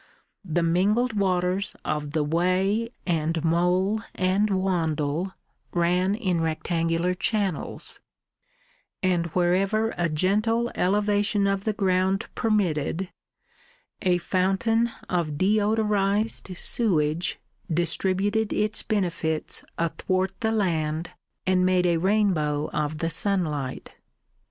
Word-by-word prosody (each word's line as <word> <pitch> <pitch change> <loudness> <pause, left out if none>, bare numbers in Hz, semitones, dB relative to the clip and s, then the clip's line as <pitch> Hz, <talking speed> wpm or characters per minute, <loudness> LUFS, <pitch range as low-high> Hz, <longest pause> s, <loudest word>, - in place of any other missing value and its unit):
The 175 -2 0
mingled 205 +9 +2
waters 185 -1 +1
of 150 -1 -2
the 155 -2 +1
Wey 185 +8 +1 0.2
and 165 -2 0
Mole 180 +5 +2
and 190 +3 +1
Wandle 175 -3 -1 0.4
ran 180 +3 +2
in 185 -7 0
rectangular 165 +2 0
channels; 195 -3 -2 1.0
and 175 -2 +1
wherever 190 +6 +1
a 170 -1 +1
gentle 215 +9 +1
elevation 205 +1 +1
of 195 0 0
the 215 - +1
ground 190 -1 +1
permitted 190 - 0 0.9
a 180 -3 +3
fountain 195 +6 +1 0.2
of 165 -5 -1
deodorised 205 0 +1
sewage 165 -8 +2 0.3
distributed 190 +6 +1
its 210 0 0
benefits 170 -7 -1
athwart 185 +3 -1
the 220 - 0
land 165 -6 -1 0.3
and 185 -1 +3
made 185 -1 +3
a 170 -1 +3
rainbow 165 -6 +1
of 150 0 -1
the 165 +2 -1
sunlight. 155 -8 -1
185 Hz, 100 wpm, -25 LUFS, 165-205 Hz, 1.0 s, a